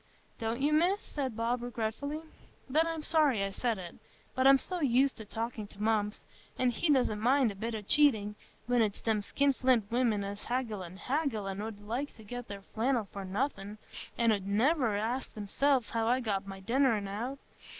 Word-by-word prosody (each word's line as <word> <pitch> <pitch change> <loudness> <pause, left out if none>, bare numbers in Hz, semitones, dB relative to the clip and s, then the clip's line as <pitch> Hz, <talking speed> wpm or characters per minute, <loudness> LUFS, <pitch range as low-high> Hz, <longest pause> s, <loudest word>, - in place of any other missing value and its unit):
"Don't 225 +2 -2
you, 295 +2 +3
Miss?" 355 +6 +3
said 265 - -4
Bob 235 +2 0
regretfully. 245 +6 -3 0.5
"Then 310 +5 +3
I'm 325 -2 -3
sorry 295 -11 +3
I 195 - -2
said 230 +2 -1
it. 175 -2 -8 0.4
But 260 0 +3
I'm 275 0 +8
so 360 +6 -3
used 265 0 +3
to 220 - -8
talking 225 0 -4
to 205 +1 -8
Mumps, 215 -1 0 0.3
an' 255 -1 +2
he 305 +7 -1
doesn't 250 -6 +2
mind 255 0 +4
a - - -9
bit 225 +3 -3
o' 215 - -5
cheating, 220 -5 +3 0.3
when 245 0 +3
it's 210 -3 0
them 220 -2 +1
skinflint 255 -3 +2
women, 235 -4 +2
as 200 +1 -6
haggle 235 -6 -2
an' 180 +1 -9
haggle, 255 -4 -1
an' 195 +1 -3
'ud 215 -1 -6
like 240 +8 -3
to 220 - -14
get 245 +3 -6
their 200 -1 -8
flannel 230 0 0
for 200 - -5
nothing, 205 0 -2 0.4
an' 230 -1 +4
'ud 200 -2 -1
niver 235 +2 +2
ask 230 +6 -2
theirselves 245 +4 +1
how 225 -1 0
I 250 +2 +3
got 200 -5 -2
my 195 0 -7
dinner 255 +4 +3
out 200 -1 -4
on't. 240 +8 -4
230 Hz, 195 wpm, -31 LUFS, 210-265 Hz, 0.5 s, I'm